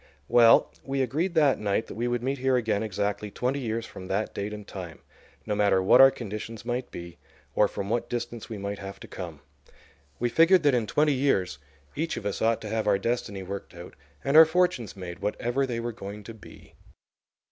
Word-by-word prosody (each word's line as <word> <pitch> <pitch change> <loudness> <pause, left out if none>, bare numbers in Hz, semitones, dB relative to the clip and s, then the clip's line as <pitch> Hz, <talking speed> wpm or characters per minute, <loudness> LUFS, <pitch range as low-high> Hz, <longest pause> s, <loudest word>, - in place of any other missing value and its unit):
Well, 115 +4 +6
we 135 0 -1
agreed 160 +8 -1
that 150 -4 +4
night 105 +1 0
that - - -9
we 120 +3 -2
would 120 -1 -1
meet 135 +1 -1
here 130 0 +2
again 110 -4 0
exactly 105 0 -2
twenty 125 +7 -2
years 115 -2 -3
from 95 -4 -10
that 100 +3 -2
date 100 +1 -4
and 105 -1 -8
time, 90 -5 -8 0.5
no 105 - -1
matter 100 -2 +3
what 125 +7 +7
our 135 - +10
conditions 110 -1 -7
might 125 +1 -2
be 85 0 -9 0.3
or 105 - +4
from 100 - -5
what 115 +3 -1
distance 120 -1 -5
we 110 - -5
might 100 0 -4
have 100 0 -8
to - - -9
come. 85 -6 -8 0.8
We 120 - 0
figured 165 +7 +5
that 145 -2 +4
in 120 -3 +1
twenty 150 +4 +2
years 95 - 0 0.4
each 160 +3 -2
of 100 - -6
us 100 - -3
ought 115 0 +2
to - - -6
have 110 -1 -1
our 100 -1 +4
destiny 100 -2 -2
worked 100 0 -7
out 85 +1 -10 0.3
and 140 +2 0
our 160 +1 +11
fortunes 160 - 0
made, 90 -2 -7
whatever 120 +6 -1
they 120 -2 -3
were 120 +1 -3
going 105 -1 -8
to 115 - -9
be." 110 - -15
115 Hz, 210 wpm, -27 LUFS, 100-130 Hz, 0.8 s, our